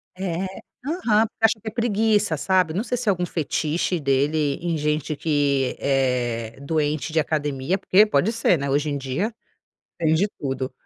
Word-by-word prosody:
É, 185 -1 -2 0.4
aham, 245 - +2
porque 225 0 -8
acha 225 0 +4
que 220 - -6
é - - -3
preguiça, 215 -5 +1
sabe. 180 +1 +1
Não 205 +6 -1
sei 245 0 -2
se 240 -2 -3
é - - +7
algum 180 -2 0
fetiche 165 +1 -1
dele 140 +1 +1
em 170 -1 -1
gente 150 0 -1
que 140 -4 +1
é 125 -4 0
doente 155 +1 -1
de 160 - +4
academia, 150 +2 -1
porque 200 +2 +5
pode 215 -1 +1
ser, 225 -7 +2
né. 140 0 -3
Hoje 145 +2 +1
em 145 - -2
dia 140 - -2 0.6
tem 160 -2 +2
de 180 +6 +3
tudo. 130 -2 -3
160 Hz, 175 wpm, -23 LUFS, 140-200 Hz, 0.6 s, é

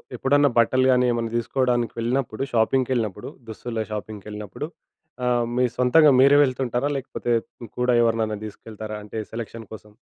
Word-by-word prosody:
ఎప్పుడన్నా 145 +3 +3
బట్టలు 130 +3 +4
గానీ 125 0 +3
ఏమన్నా 115 -1 -2
దీసుకోడానికి 120 0 0
వెళ్ళినప్పుడు, 120 0 -1
షాపింగ్‌కెళ్ళినప్పుడు 115 -3 0 0.2
దుస్తులే 110 0 -4
షాపింగ్‌కెళ్ళినప్పుడు, 105 - -6 0.6
ఆహ్, 120 -1 +2
మీ 125 - +4
సొంతగా 145 +5 +5
మీరే 140 +1 +6
వెళ్తుంటారా? 130 0 -1
లేకపోతే 125 -2 -4 0.3
హ్మ్. 115 - -8
కూడా 125 0 +2
ఎవరిననా 110 -2 0
దీసుకెళ్తారా 110 0 -8
అంటే 110 +1 -6
సెలక్షన్ 115 -1 -7
కోసం? 105 -1 -12
120 Hz, 130 wpm, -23 LUFS, 110-130 Hz, 0.6 s, మీరే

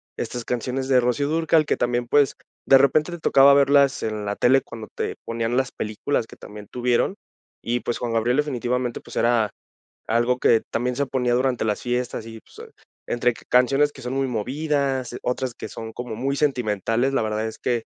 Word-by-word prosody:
estas 120 -2 -5
canciones 125 +2 -2
de 130 -2 +4
Rocío 125 +4 0
Dúrcal 160 0 +2
que - - +1
también, 120 0 -1
pues, 145 +1 +3 0.3
de 135 - +7
repente 150 +5 +3
te 175 - -6
tocaba 140 -2 +6
verlas 140 0 +4
en 110 -1 -3
la 100 0 -3
tele 135 +2 +4
cuando 110 -2 -9
te - - -3
ponían 115 +1 -2
las 130 -1 0
películas 110 +3 -2
que - - -14
también 105 0 -11
tuvieron. 125 +9 +1 0.5
Y, 120 +1 -1
pues, 120 - -2
Juan 120 -2 -3
Gabriel 120 +4 +1
definitivamente, 125 -4 -1
pues, - - -13
era 115 -3 +2 0.6
algo 120 +2 +1
que 115 -2 +4
también, 125 +1 -1
se 140 0 0
ponía 125 -2 0
durante 125 -2 +1
las 105 -2 -1
fiestas 125 -2 -2
y, 115 -1 -9
pues, - - -13 0.4
entre 120 0 +1
canciones 135 +5 +2
que - - -13
son 125 +1 -4
muy 135 0 0
movidas, 135 +1 -1
otras 125 -1 -2
que - - -7
son 110 0 -8
como 120 -3 -6
muy 135 +3 -1
sentimentales. 120 -2 0
La - - +2
verdad 110 0 -2
es 110 - -7
que, 120 -2 -1
125 Hz, 190 wpm, -23 LUFS, 115-135 Hz, 0.6 s, de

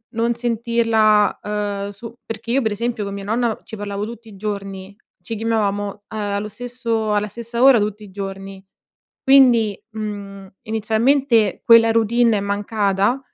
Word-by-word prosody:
non 235 +1 +1
sentirla, 230 -3 +2
uhm 205 -1 -3
su 225 +3 -10
perché 225 +1 -7
io 270 +2 +2
per 220 - 0
esempio, 230 +1 -2
con 200 0 -5
mia 200 0 -6
nonna 225 +2 -1
ci - - -9
parlavo 205 -1 -4
tutti 230 +1 -8
i 205 - -13
giorni. 195 -1 -6 0.3
Ci 230 - -6
chiamavamo, 210 -2 0
uhm, 200 +1 -10 0.2
allo 205 0 -2
stesso 230 -1 -3
alla 210 0 +1
stessa 235 +2 -5
ora, 265 -3 +7
tutti 210 0 -3
i 205 - -12
giorni. 195 0 -7 0.6
Quindi, 245 -6 +5
mhmm, 205 -3 -6 0.2
inizialmente 225 +2 +1
quella 230 -1 +7
routine 230 0 +3
è - - -2
mancata 200 +3 0
215 Hz, 155 wpm, -20 LUFS, 200-230 Hz, 0.6 s, ora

